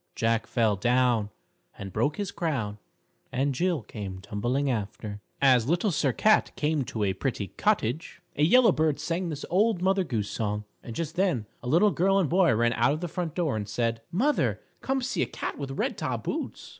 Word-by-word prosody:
Jack 115 Hz, 0 st, +1 dB
fell 110 Hz, -3 st, +2 dB
down 120 Hz, 0 st, +2 dB, 0.5 s
And 95 Hz, -1 st, -7 dB
broke 145 Hz, +8 st, 0 dB
his 205 Hz, -2 st, -3 dB
crown, 115 Hz, -11 st, -2 dB, 0.5 s
And 135 Hz, +2 st, 0 dB
Jill 170 Hz, -1 st, 0 dB
came 100 Hz, -4 st, -6 dB
tumbling 120 Hz, +8 st, -1 dB
after._ 105 Hz, -3 st, -3 dB, 0.2 s
As 130 Hz, -3 st, +4 dB
Little 175 Hz, +5 st, +2 dB
Sir 145 Hz, -4 st, +1 dB
Cat 215 Hz, -, +3 dB
came 150 Hz, -1 st, 0 dB
to 110 Hz, -3 st, -3 dB
a 95 Hz, -2 st, +1 dB
pretty 100 Hz, -1 st, -3 dB
cottage, 160 Hz, -, -1 dB, 0.2 s
a -, -, -2 dB
yellow 230 Hz, +8 st, +6 dB
bird 155 Hz, -3 st, +1 dB
sang 170 Hz, +3 st, -2 dB
this 150 Hz, -2 st, -5 dB
Old 205 Hz, +2 st, +3 dB
Mother 190 Hz, 0 st, +3 dB
Goose 110 Hz, -, -2 dB
song. 105 Hz, -1 st, -2 dB, 0.2 s
And 115 Hz, -, -8 dB
just 165 Hz, -1 st, -3 dB
then 175 Hz, -, +1 dB, 0.2 s
a -, -, -7 dB
little 185 Hz, +9 st, +5 dB
girl 190 Hz, +5 st, +2 dB
and 180 Hz, -7 st, +1 dB
boy 180 Hz, -1 st, +4 dB
ran 120 Hz, +1 st, +2 dB
out 120 Hz, +5 st, +3 dB
of 155 Hz, -, -4 dB
the 175 Hz, -, -2 dB
front 170 Hz, -2 st, -4 dB
door, 165 Hz, -9 st, 0 dB
and 105 Hz, -1 st, -4 dB
said: 115 Hz, 0 st, -1 dB
"Mother, 270 Hz, -, +1 dB, 0.2 s
come 265 Hz, -1 st, -1 dB
see 255 Hz, -, -1 dB
a -, -, +1 dB
cat -, -, -5 dB
with 140 Hz, -2 st, -4 dB
red -, -, -1 dB
top -, -, -2 dB
boots!" -, -, -4 dB
140 Hz, 195 wpm, -27 LUFS, 115-175 Hz, 0.5 s, yellow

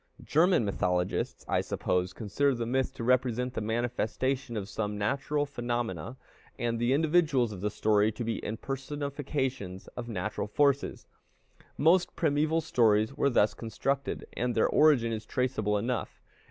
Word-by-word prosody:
German 170 Hz, -, +3 dB
mythologists, 90 Hz, -2 st, -1 dB
I -, -, +1 dB
suppose, 90 Hz, 0 st, -1 dB
consider 130 Hz, +7 st, 0 dB
the 115 Hz, -1 st, -2 dB
myth 130 Hz, +2 st, 0 dB
to 120 Hz, -, -5 dB
represent 125 Hz, 0 st, +1 dB
the -, -, -3 dB
manifestation 120 Hz, +2 st, -1 dB
of 100 Hz, -2 st, -4 dB
some 105 Hz, -1 st, -3 dB
natural 140 Hz, +7 st, 0 dB
phenomena, 120 Hz, -2 st, -3 dB, 0.4 s
and 115 Hz, -1 st, -1 dB
the 120 Hz, +1 st, +1 dB
individuals 150 Hz, -5 st, +3 dB
of 95 Hz, -3 st, -7 dB
the 105 Hz, -, 0 dB
story 105 Hz, 0 st, +2 dB
to 120 Hz, -, -4 dB
be 115 Hz, 0 st, -2 dB
impersonifications 135 Hz, -4 st, -4 dB
of 120 Hz, -1 st, -6 dB
natural 105 Hz, 0 st, -3 dB
forces. 140 Hz, +5 st, +1 dB, 0.7 s
Most 175 Hz, +4 st, +3 dB
primeval 155 Hz, +1 st, +1 dB
stories 110 Hz, -6 st, +3 dB
were 140 Hz, 0 st, +2 dB
thus 105 Hz, -5 st, +3 dB
constructed, 135 Hz, +5 st, -3 dB
and 120 Hz, 0 st, -1 dB
their 110 Hz, -, +4 dB
origin 140 Hz, -7 st, +4 dB
is 110 Hz, -1 st, -3 dB
traceable 110 Hz, -4 st, 0 dB
enough. 120 Hz, +3 st, -3 dB
120 Hz, 140 wpm, -29 LUFS, 110-140 Hz, 0.7 s, their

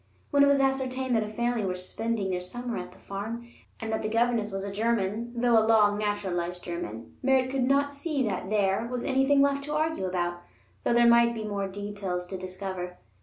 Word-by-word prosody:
When 285 Hz, -, +4 dB
it -, -, +6 dB
was 280 Hz, 0 st, +4 dB
ascertained 265 Hz, -2 st, +1 dB
that 225 Hz, -, +3 dB
a -, -, -5 dB
family 235 Hz, +1 st, -1 dB
were 185 Hz, -2 st, -1 dB
spending 195 Hz, +2 st, -2 dB
their 180 Hz, -1 st, -1 dB
summer 240 Hz, +6 st, -5 dB
at -, -, -7 dB
the -, -, -17 dB
farm, 225 Hz, +4 st, -6 dB, 0.3 s
and 220 Hz, 0 st, -3 dB
that 220 Hz, -, 0 dB
the 215 Hz, -, -2 dB
governess 230 Hz, -1 st, +1 dB
was 195 Hz, 0 st, -3 dB
a 200 Hz, -, -4 dB
German, 220 Hz, +1 st, 0 dB
though 235 Hz, -2 st, +5 dB
a -, -, +4 dB
long 210 Hz, -2 st, +4 dB
naturalized 180 Hz, -4 st, -2 dB
German, 115 Hz, -10 st, -6 dB
Merritt 260 Hz, -1 st, +3 dB
could 265 Hz, -2 st, +1 dB
not 280 Hz, +2 st, +2 dB
see 285 Hz, -1 st, -1 dB
that 190 Hz, -2 st, -3 dB
there 205 Hz, +1 st, +1 dB
was 245 Hz, 0 st, -3 dB
anything 275 Hz, +1 st, +4 dB
left 280 Hz, 0 st, +1 dB
to 300 Hz, 0 st, -3 dB
argue 310 Hz, -9 st, 0 dB
about, 175 Hz, -1 st, -2 dB, 0.4 s
though -, -, +2 dB
there 240 Hz, 0 st, +5 dB
might 235 Hz, 0 st, +5 dB
be 220 Hz, -, -4 dB
many 200 Hz, -2 st, -3 dB
details 200 Hz, -3 st, -4 dB
to 190 Hz, +1 st, -6 dB
discover. 185 Hz, -1 st, -5 dB
220 Hz, 210 wpm, -28 LUFS, 190-250 Hz, 0.4 s, it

